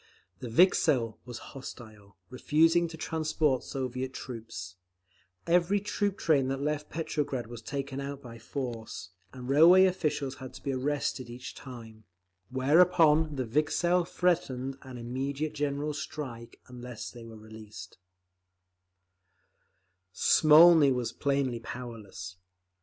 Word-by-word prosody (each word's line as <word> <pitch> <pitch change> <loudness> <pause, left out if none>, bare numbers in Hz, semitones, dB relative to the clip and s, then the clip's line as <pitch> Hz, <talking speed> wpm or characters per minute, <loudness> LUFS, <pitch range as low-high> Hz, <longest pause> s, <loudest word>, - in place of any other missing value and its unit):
The 125 - -6
Vikzhel 120 - +3
was 120 -1 -7 0.2
hostile, 110 -7 -11
refusing 165 +6 +3
to 165 0 -9
transport 155 -4 0
Soviet 130 -1 -4
troops; 110 -7 -8 0.7
every 175 +4 +3
troop 205 -1 -2
train 140 -5 +2
that 135 0 -2
left 150 +1 -2
Petrograd 145 -5 -3
was 115 0 -9
taken 140 +2 -5
out 140 0 -5
by 115 -3 -11
force, 115 -6 -6 0.2
and 125 -1 -9
railway 170 +7 +7
officials 150 -7 -1
had 130 -2 -9
to - - -12
be 140 - -2
arrested 130 -2 -2
each 120 +1 -8
time—whereupon 130 - +1
the 130 -2 -2
Vikzhel 160 +8 +1
threatened 135 -8 -1
an 130 -2 -10
immediate 135 +5 -3
general 145 0 -2
strike 135 -5 -7
unless 125 -2 -8
they 120 -1 -11
were 115 -1 -11
released…. 110 -3 -11 2.2
Smolny 155 - +6
was 125 -2 -1
plainly 140 -4 -1
powerless. 105 -8 -8
135 Hz, 115 wpm, -29 LUFS, 120-150 Hz, 2.2 s, railway